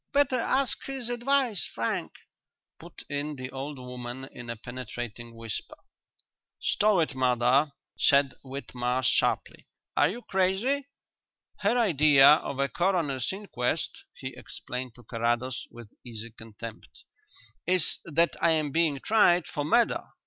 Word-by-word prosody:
Better 280 -3 +3
ask 265 +2 +1
his 265 -3 -3
advice, 245 -3 +1
Frank," 115 - -2 0.7
put - - -11
in 145 +1 -3
the 130 -1 -7
old 140 +2 -5
woman 125 0 -7
in 120 -1 -9
a 115 - -3
penetrating 120 -1 -7
whisper. 115 -2 -6 0.8
"Stow 205 -4 +3
it, 155 - 0
mother!" 130 +3 +3 0.3
said 140 -1 +4
Whitmarsh 130 -2 -2
sharply. - - 0 0.3
"Are - - +4
you 235 +6 -6
crazy? 200 +9 +1 0.7
Her 210 +4 +2
idea 150 - +6
of 150 -2 +3
a 140 0 +2
coroner's 160 -4 0
inquest," 190 -11 -3
he - - -7
explained 125 -1 -6
to 120 - -15
Carrados, 120 +2 -1
with 120 -3 -13
easy 115 -1 -6
contempt, 115 0 -10 0.6
"is 180 -2 +3
that 165 +1 +2
I 165 - +5
am 155 -2 0
being 155 -3 +1
tried 180 -6 +4
for 145 - -3
murder. 235 +11 +3
140 Hz, 130 wpm, -28 LUFS, 125-190 Hz, 0.8 s, idea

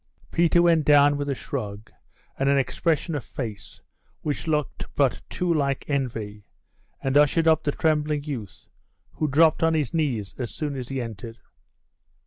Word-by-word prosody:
Peter 170 +1 +3
went 165 -2 +4
down 145 0 +5
with 145 0 -3
a 140 - 0
shrug, 105 -2 -6 0.5
and 135 +1 +2
an 140 - +4
expression 160 +4 0
of 145 -5 -3
face 110 -6 -7 0.4
which 150 +2 -3
looked 150 -4 -1
but - - +2
too 180 -1 0
like 140 -3 0
envy, 110 -7 -3 0.6
and 135 0 0
ushered 150 +3 +4
up 160 -1 +4
the 145 - +1
trembling 150 -1 0
youth, 125 -10 -7 0.5
who 155 - -2
dropped 155 +2 +4
on 165 0 +3
his 150 -6 -1
knees 130 - -1
as 120 -3 -3
soon 145 +6 -4
as 125 -2 -5
he 135 -1 -3
entered. 115 -1 -7
145 Hz, 160 wpm, -25 LUFS, 125-155 Hz, 0.6 s, down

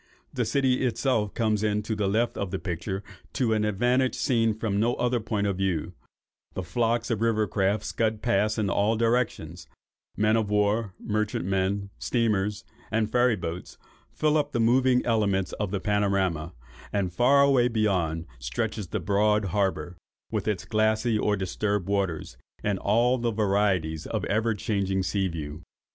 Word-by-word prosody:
The - - 0
city 135 -2 +1
itself 120 -4 0
comes 110 -3 +1
into 105 +1 -1
the 105 -2 0
left 115 +4 +1
of 100 - -3
the 95 - -2
picture 95 +2 -4 0.3
to 120 -4 +1
an 110 -1 +1
advantage 125 +5 +1
seen 115 -4 +1
from 105 -3 -1
no 120 +3 +2
other 125 0 0
point 105 -2 -2
of 100 -2 -1
view, 95 -5 -1 0.6
the 95 - -3
flocks 115 +7 0
of 110 -2 -1
river 110 -2 +2
craft 100 +1 0
scud 110 -1 -1
past 110 -2 +1
in 105 -2 0
all 105 +3 +2
directions, 115 -8 -1 0.5
men 105 +2 +3
of 110 -2 0
war, 105 -1 +1
merchantmen, 100 -2 -1
steamers, 105 -3 0 0.3
and 110 -1 0
ferry 125 -1 +3
boats, 85 -2 -6 0.3
fill 155 0 +1
up 145 -1 -1
the 120 - 0
moving 125 +2 +3
elements 100 -5 +1
of 105 -2 -1
the 100 0 -2
panorama; 95 -5 0 0.4
and 95 -4 -1
far 135 +6 +5
away 135 -3 +4
beyond 95 -8 0
stretches 95 - -3
the - - -3
broad 105 +3 +2
harbour, 95 -3 -1 0.3
with - - -2
its 95 -4 -1
glassy 110 +2 +1
or 105 -1 +1
disturbed 95 +1 -1
waters, 95 -11 -2 0.3
in 100 -2 0
all 120 +5 +2
the 120 0 0
varieties 100 -7 0
of - - -2
ever 110 +1 +1
changing 95 -2 -1
sea 95 +1 0
view. 80 -2 -6
105 Hz, 160 wpm, -26 LUFS, 95-115 Hz, 0.6 s, far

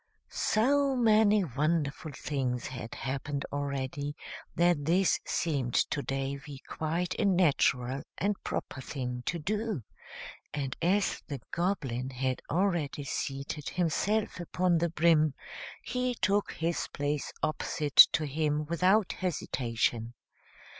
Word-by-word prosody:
So 275 +4 +2
many 215 -3 +4
wonderful 155 +1 -1
things 130 -3 -2
had 125 -2 -6
happened 140 +1 -3
already 140 0 -3 0.4
that 170 -4 +3
this 180 +4 +3
seemed 135 -7 -1
to 145 - +2
Davy 135 +1 -4
quite 170 +3 -2
a 215 - +2
natural 140 -8 +2 0.2
and 205 0 -1
proper 130 - -4
thing 125 -2 -4
to 170 - 0
do, 205 - -2 0.7
and 135 -3 -2
as 185 +4 +2
the 140 -3 -4
Goblin 135 -9 -1
had 130 0 -2
already 170 -5 0
seated 140 +1 -4
himself 190 +5 0
upon 175 0 +1
the 170 +1 +1
brim, 155 -3 +3 0.5
he 250 0 -1
took 205 -2 +1
his 165 +1 -1
place 145 0 -2
opposite 150 -1 -2
to 155 - 0
him 150 +1 0
without 185 +5 +3
hesitation. 120 -8 -1
150 Hz, 115 wpm, -30 LUFS, 135-185 Hz, 0.7 s, many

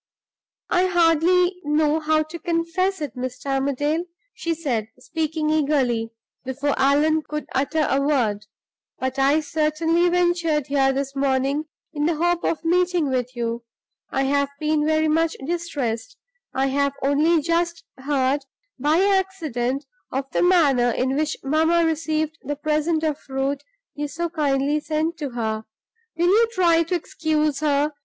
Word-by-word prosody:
"I 360 +1 +3
hardly 350 +1 +3
know 300 +1 +2
how 310 0 +2
to 320 +2 -9
confess 340 +2 -1
it, 285 -7 -4
Mr. 255 +1 -5
Armadale," 280 +5 0 0.3
she 335 -9 -2
said, 250 -10 -2
speaking 315 -6 -2
eagerly, 270 -7 +1 0.3
before 275 +2 -1
Allan 295 +3 +3
could 300 0 -5
utter 290 +3 +1
a 270 - +1
word, 225 -8 0 0.5
"but 260 +1 -3
I 280 +3 +4
certainly 320 +3 +1
ventured 345 -4 +1
here 275 -1 +2
this 275 0 -3
morning 275 +2 0 0.3
in 295 0 0
the 335 - +1
hope 345 +2 +1
of 330 0 -1
meeting 350 -2 +2
with 250 -1 -2
you. 235 0 -3 0.5
I 270 - 0
have 280 +1 +1
been 305 0 +1
very 315 0 +2
much 325 +1 +2
distressed; 320 - -3 0.3
I 265 +1 0
have 280 +1 +1
only 300 +5 +3
just 335 +2 -1 0.2
heard, 270 0 +1 0.4
by 300 +6 +3
accident, 320 -10 0 0.3
of 265 +1 -2
the - - +1
manner 295 -9 +4
in 260 +3 0
which 305 +1 -1
mamma 320 +4 +3
received 315 0 -1
the 290 - -4
present 310 +2 0
of 305 -2 0
fruit 270 +1 -2 0.3
you 295 0 -3
so 340 +3 -4
kindly 290 -2 +1
sent 315 +2 -2
to 290 -3 -3
her. 220 -2 -2 0.5
Will 340 - +2
you 450 +4 +5
try 340 -4 +4
to 335 +2 -1
excuse 310 -3 -1
her? 295 0 +1
305 Hz, 150 wpm, -23 LUFS, 275-330 Hz, 0.5 s, you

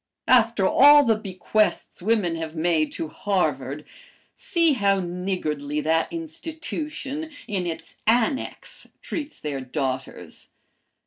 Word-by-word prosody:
After 230 -5 +4
all 290 +5 +8
the 230 -4 +4
bequests 210 0 -1
women 200 -4 +1
have 160 0 -5
made 160 -1 +1
to 160 - -3
Harvard 150 -7 -1 0.5
see 340 -10 +2
how 200 -5 +2
niggardly 175 -5 -2
that 160 +2 +1
institution, 320 -2 -5 0.2
in 190 -4 -2
its 165 - -7
'annex,' 240 +3 0 0.2
treats 300 -1 -5
their 145 -3 -4
daughters. 130 0 -5
195 Hz, 110 wpm, -24 LUFS, -, 0.5 s, all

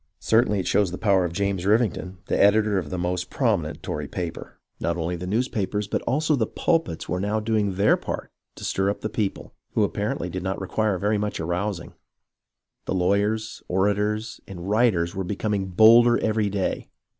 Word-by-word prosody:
Certainly 110 -2 +2
it - - -7
shows 100 -3 +2
the 90 - -5
power 100 -4 +3
of 85 - -3
James 100 0 -1
Rivington, 100 -3 +1
the - - -1
editor 105 0 +4
of 80 -5 -6
the 90 - -3
most 90 0 -2
prominent 105 - -1
Tory 75 -1 -4
paper. 85 -1 -6 0.2
Not 85 0 -1
only 85 +1 -2
the 90 +1 -6
newspapers, 105 -2 -1
but - - -1
also 150 +4 +2
the 115 -5 0
pulpits, 165 - -1
were 90 - -1
now 105 +3 0
doing 105 -3 0
their 100 +3 +4
part - - -5 0.2
to - - -11
stir 95 +1 0
up 100 - -3
the 110 - -2
people, 105 -2 -3 0.2
who - - +2
apparently - - -2
did 95 - -4
not 95 +1 -3
require 100 +1 0
very 105 +3 0
much 105 0 -2
arousing. 85 +2 -3 0.9
The - - -2
lawyers, 100 +4 0
orators, 105 +4 0
and 90 -2 -8
writers 100 -6 +2
were 95 -1 -3
becoming 100 +1 -2
bolder 115 +5 +6
every 110 -2 0
day. 100 -1 -2
100 Hz, 180 wpm, -24 LUFS, 90-110 Hz, 0.9 s, bolder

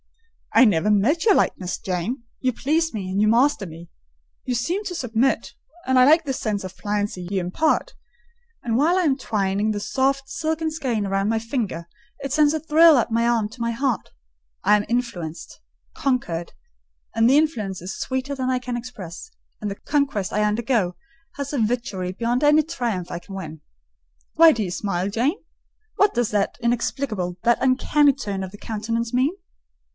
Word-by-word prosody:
"I 260 - +7
never 205 -2 +2
met 225 +11 +2
your 415 -4 +6
likeness. 180 -1 0
Jane, 190 +7 -3 0.2
you 255 - +2
please 315 +7 0
me, 195 -4 -4
and 195 +2 0
you 215 - +4
master 235 0 +3
me—you 65 - -10
seem 345 - -1
to 360 - -4
submit, 250 -3 0 0.3
and 260 0 +2
I 255 - +7
like 315 +3 +5
the 270 - -1
sense 210 -5 -2
of 185 0 -8
pliancy 205 -3 -3
you 195 -1 0
impart; 310 - 0 0.7
and 230 -2 -1
while 325 +7 +3
I 370 - +2
am 290 -5 +3
twining 205 -4 -1
the 210 - -2
soft, 270 +6 0
silken 320 0 -2
skein 245 -10 -2
round 195 +1 0
my 225 - +1
finger, 220 -8 -3 0.3
it 275 -1 -4
sends 300 0 +4
a 315 - 0
thrill 320 0 +6
up 235 -1 0
my 230 +1 +2
arm 230 -3 +2
to 240 +2 -12
my 235 0 0
heart. 250 0 -1 0.5
I 210 - +5
am 210 0 0
influenced—conquered; 175 - -3 0.6
and 225 +1 +4
the 275 - +5
influence 220 - 0
is 185 +2 -6
sweeter 260 +2 -3
than 260 -1 -2
I 255 -1 +1
can 250 -1 -4
express; 235 - -8 0.3
and 210 - -2
the 200 - -4
conquest 275 -8 -1
I 210 - +1
undergo 210 -3 0 0.4
has 280 0 -5
a 270 - +1
witchery 215 -5 -1
beyond 235 +7 -1
any 300 +1 +5
triumph 235 - -3
I 175 - -4
can 195 +2 -11
win. 160 -5 -7 0.7
Why 330 0 +8
do 225 -7 -1
you 180 - -4
smile, 190 0 -2
Jane? 240 +9 0 0.6
What 405 +1 +3
does 240 -2 0
that 205 -2 0
inexplicable, 235 -6 -1
that 235 0 +3
uncanny 275 +2 +3
turn 200 -8 -4
of 190 +1 -7
countenance 230 +2 -3
mean?" 265 +8 +2
235 Hz, 175 wpm, -23 LUFS, 200-275 Hz, 0.7 s, Why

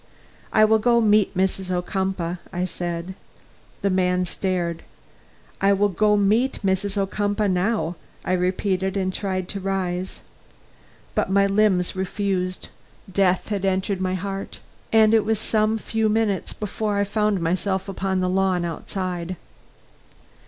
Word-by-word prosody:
"I 215 - +6
will 220 0 +4
go 235 +2 +4
meet 210 -4 +3
Mrs. 190 0 0
Ocumpaugh," 180 -1 -1
I 180 +1 -1
said. 175 0 -4 0.7
The 200 - +2
man 180 0 +2
stared. 175 -2 -2 0.8
"I 200 0 +5
will 205 +1 +2
go 210 +3 +3
meet 220 +6 +2
Mrs. 195 +1 0
Ocumpaugh 205 +1 0
now," 180 -1 0 0.3
I 185 - 0
repeated, 185 +1 0
and 185 -1 -1
tried 185 -2 -2
to 200 - -3
rise. 185 -1 -2 0.9
But - - 0
my 200 +1 +4
limbs 195 -3 +2
refused; 185 -1 -2 0.4
death 185 -1 +2
had 200 -2 -2
entered 190 0 0
my 185 0 0
heart, 195 +1 -5 0.3
and 220 -1 +5
it 220 -2 +5
was 220 +1 +1
some 215 +1 +1
few 220 0 0
minutes 215 -3 0
before 210 0 -2
I 200 - +3
found 210 -1 +1
myself 190 +3 -1
upon 190 -1 -1
the 185 - +1
lawn 185 -1 +1
outside. 180 +1 -4
190 Hz, 140 wpm, -23 LUFS, 185-205 Hz, 0.9 s, I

